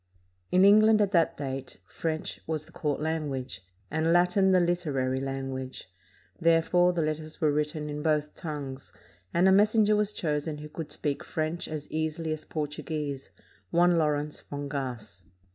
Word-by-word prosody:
In 185 +1 +6
England, 215 +2 +7
at 205 -2 +2
that 170 -4 +2
date 135 -2 -5
French 160 -1 -3
was 155 -1 -2
the - - -18
court 150 -3 -2
language, 140 - -3 0.3
and 160 +2 +1
Latin 180 +2 +4
the 185 - +5
literary 150 -7 0
language; 135 -5 -5 0.5
therefore, 165 +2 +4
the 170 -2 0
letters 155 0 -4
were 155 -2 +3
written 150 +1 -1
in 150 0 -4
both 150 -1 +1
tongues, 140 -4 -6 0.4
and 175 +2 +4
a - - +6
messenger 210 +2 +5
was 210 0 +1
chosen 150 -4 -2
who 150 +1 -8
could 155 -1 -6
speak 145 -1 -2
French 160 +2 -2
as 155 -2 -5
easily 160 +1 -2
as 155 - -7
Portuguese, 150 -2 -4 0.4
one 175 +1 +4
Lawrence 150 -1 0
Fongasse. 130 - -5
155 Hz, 150 wpm, -28 LUFS, 145-170 Hz, 0.5 s, England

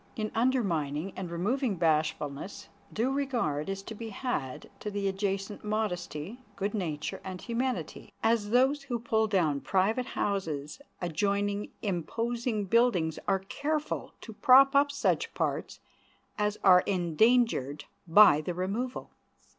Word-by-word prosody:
In 215 -3 -3
undermining 195 - 0
and 185 -2 -5
removing 210 +7 -1
bashfulness, 155 0 -1 0.2
due 235 +5 0
regard 240 - -1
is 195 0 -4
to 220 - -7
be 225 +1 -7
had 195 - -4
to 210 - -4
the 200 -1 -2
adjacent 195 +1 -2
modesty, 210 - -3 0.2
good 200 +1 -2
nature, 160 -8 -3
and 185 -1 -6
humanity, 245 +3 -3
as 225 -2 +2
those 265 +5 +3
who 265 -4 -3
pull 220 -1 +1
down 170 -9 +1
private 210 +6 +1
houses 165 - -3 0.2
adjoining 200 +4 -1
imposing 225 +4 -2
buildings 190 -7 +2
are 195 -1 +1
careful 300 +4 -3
to 225 - -9
prop 270 +5 +6
up 285 +1 +4
such 280 - 0
parts - - -2 0.6
as 210 0 -1
are 180 -2 +7
endangered 185 - +2 0.2
by 165 -4 +7
the 175 +3 -4
removal. 210 +8 -3
205 Hz, 130 wpm, -29 LUFS, 175-235 Hz, 0.6 s, are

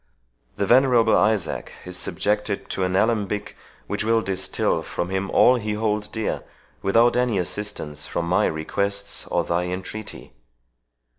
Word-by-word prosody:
The 100 - 0
venerable 120 -1 +5
Isaac 105 -5 +1
is 90 0 -6
subjected 105 +2 -1
to 95 - -1
an 90 0 0
alembic, 105 -1 0 0.3
which 105 0 -2
will 115 0 +2
distil 95 0 -1
from 85 - -4
him 95 +1 -1
all 125 +1 +5
he 105 -2 -2
holds 105 -1 -1
dear, 110 0 -3 0.4
without 115 +5 +4
any 125 -4 +2
assistance 90 -5 -3
from 85 - -2
my 90 +2 +3
requests 100 +5 -2
or - - +1
thy 85 +1 0
entreaty. 95 +4 -6
105 Hz, 140 wpm, -23 LUFS, 95-110 Hz, 0.4 s, venerable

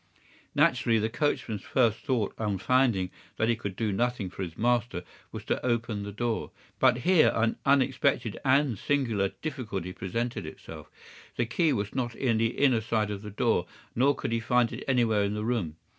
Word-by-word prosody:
"Naturally, 130 -6 +3
the 110 +1 0
coachman's 120 -6 -1
first 115 -4 +1
thought, 120 -6 -1
on 105 -3 -1
finding 110 -4 +2 0.3
that 110 - +1
he 120 - +3
could 100 -4 -5
do 110 0 -1
nothing 115 -2 -1
for 95 - -8
his 85 -3 -5
master, 120 -5 0 0.3
was - - -7
to - - -1
open 115 -3 -1
the 100 0 -5
door. 115 +2 -2 0.3
But 130 -2 +5
here 175 +5 +4
an 115 0 +1
unexpected 135 -4 +2
and 135 -5 +2
singular 115 -9 +1 0.2
difficulty 105 - -4
presented 115 +7 -3
itself. - - -10 0.5
The 120 - 0
key 155 +7 +1
was 105 -6 -2
not 120 -3 -2
in 115 -4 +1
the 115 +1 0
inner 130 -5 +3
side 110 -1 0
of 100 -1 -5
the 105 - -7
door, 105 -4 +1 0.3
nor 135 +4 +3
could 135 - -4
he 115 - +1
find 120 0 +2
it - - -6
anywhere 120 -5 +3
in 100 +1 -1
the 105 0 -3
room. 110 -10 -1
115 Hz, 185 wpm, -28 LUFS, 105-125 Hz, 0.5 s, But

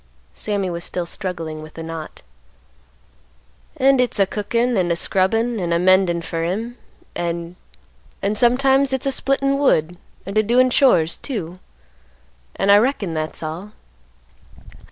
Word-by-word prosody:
Sammy 205 -3 -2
was 170 0 -5
still 180 0 -3
struggling 165 -4 -5
with 155 0 -12
the 165 - -7
knot. 160 - -8 1.5
"An' 270 0 +4
hit's 245 -4 +1
a 195 - +5
cookin' 230 +5 -1
an' 180 -2 +1
a 170 - +2
scrubbin' 225 +6 0
an' 175 -2 -2
a 170 - +3
mendin' 180 -1 +3
fer 165 0 -3
him, 220 +8 -3 0.4
an'—an'—sometimes 175 - -1
hit's 265 0 -2
a 275 - +1
splittin' 275 +1 0
wood, 175 - +2 0.3
an' 200 +2 -4
a - - +6
doin' 250 +4 +3
chores, 175 - +3
too; 185 - -6 1.0
an' 195 +1 +2
I 200 - +8
reckon 210 -6 0
that's 155 +1 -4
all." 175 +7 -6
190 Hz, 135 wpm, -20 LUFS, 170-240 Hz, 1.5 s, I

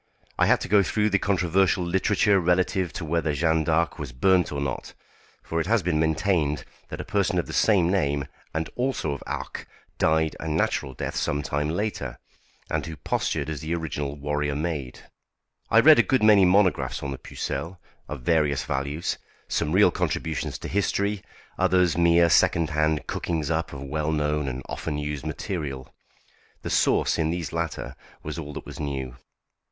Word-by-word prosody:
I - - +4
had - - +4
to - - -4
go 100 +1 +5
through 105 +2 +1
the 100 - +3
controversial 95 -1 +2
literature 100 +3 +2
relative 90 0 +1
to 80 - -5
whether 80 -1 0
Jeanne 80 +1 +2
d'Arc 80 +2 +1
was 70 -4 -5
burnt 90 +7 +2
or 70 - -3
not, 70 -3 -4 0.5
for 80 0 -1
it 80 - -4
has 115 -2 +2
been 80 -3 +1
maintained 80 -2 +1 0.3
that - - -6
a - - -3
person - - 0
of - - +1
the - - -8
same 100 -6 +4
name, 70 -7 +1 0.3
and 80 0 -2
also 125 - -1
of 70 - -5
Arques, - - -5 0.3
died 80 0 +2
a 80 - -5
natural 70 -3 0
death - - -4
some 75 +1 -1
time 75 +2 -1
later, 80 - -3 0.5
and - - -1
who 80 - -6
postured 75 +1 -2
as 80 -2 -4
the 80 +2 -2
original 75 -4 -3
warrior 75 0 -2
maid. 75 -5 -3 0.7
I 115 - +6
read 150 +3 +8
a - - +9
good 120 +2 +1
many 105 -3 +7
monographs 95 +1 +2
on 70 - -3
the 65 - -6
Pucelle, 90 +2 -5 0.3
of 75 -4 -6
various 75 -3 +2
values; 70 +5 -2 0.3
some 75 - -1
real 95 0 +5
contributions 75 -5 -2
to - - -7
history, 100 +1 0 0.4
others 90 -2 +3
mere 85 0 +5
second 85 -1 +3
hand 75 0 +1
cookings 80 -3 -2
up 80 0 -1
of 70 -1 -7
well 75 +2 -2
known 75 -1 0
and 65 0 -4
often 75 - -4
used 75 0 -4
material. 75 -5 -5 0.7
The - - -4
sauce - - +2
in 80 -1 +1
these 85 -1 -3
latter 85 -1 -3 0.3
was - - -5
all 75 -2 -7
that - - -7
was - - -9
new. 65 -4 -4
80 Hz, 180 wpm, -25 LUFS, 75-90 Hz, 0.7 s, a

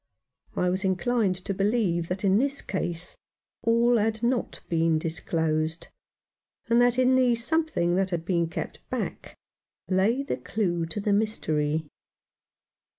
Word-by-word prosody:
I 180 0 +1
was 190 +2 -1
inclined 195 +1 +1
to 195 - -1
believe 195 -4 +1
that 185 +3 -4
in 195 +2 +4
this 275 +2 -1
case 175 -3 -2 0.5
all 235 +1 +3
had 220 +1 -1
not 240 0 0
been 165 -1 +2
disclosed, 160 0 -2 0.8
and 235 +1 +4
that 245 0 +3
in 255 0 +4
the 250 -2 +4
something 240 - 0
that 190 0 +1
had 170 -2 -3
been 170 -2 +1
kept 165 - -5
back - - -4 0.5
lay 200 +9 +2
the 280 - -2
clue 175 -6 -1
to 165 - -4
the 205 0 +1
mystery. 160 -8 0
195 Hz, 140 wpm, -27 LUFS, 170-235 Hz, 0.8 s, in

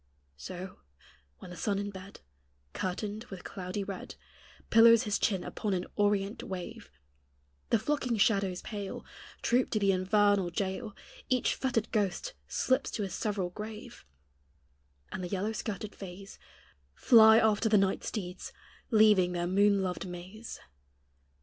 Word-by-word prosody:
So, 180 - -8 0.6
when 180 - -11
the - - -8
sun 200 +3 -1
in 205 0 -3
bed, 190 +1 -11 0.5
Curtained 205 +4 -3
with 195 -5 -9
cloudy 190 +1 -5
red, 195 -1 -7 0.6
Pillows 230 +1 +7
his 210 -3 -1
chin 190 -4 +1
upon 205 -3 -2
an 180 - -2
orient 205 0 +1
wave, 195 +4 -7 0.8
The - - +4
flocking 250 0 -1
shadows 195 -3 +2
pale 205 -3 -6 0.4
Troop 245 +2 +2
to - - 0
the 200 -1 +3
infernal 195 0 +2
jail 200 +4 -3 0.3
Each 255 -2 +2
fettered 240 -5 -1
ghost 205 -5 -1
slips 260 - +1
to 210 - -3
his 195 - -4
several 195 -4 -2
grave; 215 +2 -8 1.1
And 185 - -5
the - - -3
yellow 200 +3 -1
skirted 215 -1 -5
fays 195 +1 -10 0.6
Fly 220 -2 +7
after 220 0 +3
the 210 - +5
night 195 -1 +1
steeds, 180 -4 -5 0.4
leaving 210 -5 +5
their 175 0 -1
moon 200 +2 +3
loved 185 +1 -3
maze. 185 +6 -8
200 Hz, 135 wpm, -30 LUFS, 185-220 Hz, 1.1 s, Pillows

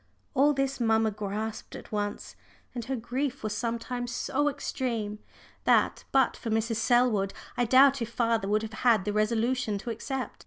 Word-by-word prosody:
All 285 +2 +4
this 275 -1 -1
mamma 225 -2 +2
grasped 210 +1 -5
at - - -10
once, 205 -1 -3 0.4
and 240 -3 -5
her 265 +2 -2
grief 255 +3 -3
was 215 -1 -2
sometimes 235 +2 -3
so 290 +4 0
extreme 230 -7 -3 0.5
that, - - +3
but 265 -1 +3
for 230 - -6
Mrs. 225 +1 0
Selwood, 230 -4 +2 0.2
I 245 - +1
doubt 270 +2 +6
if 230 - -2
father 230 -3 0
would 215 +2 +1
have 220 0 -6
had 225 -6 +4
the 210 - -1
resolution 220 +1 +1
to 230 +4 -5
accept. 260 +3 -4
230 Hz, 165 wpm, -28 LUFS, 215-255 Hz, 0.5 s, doubt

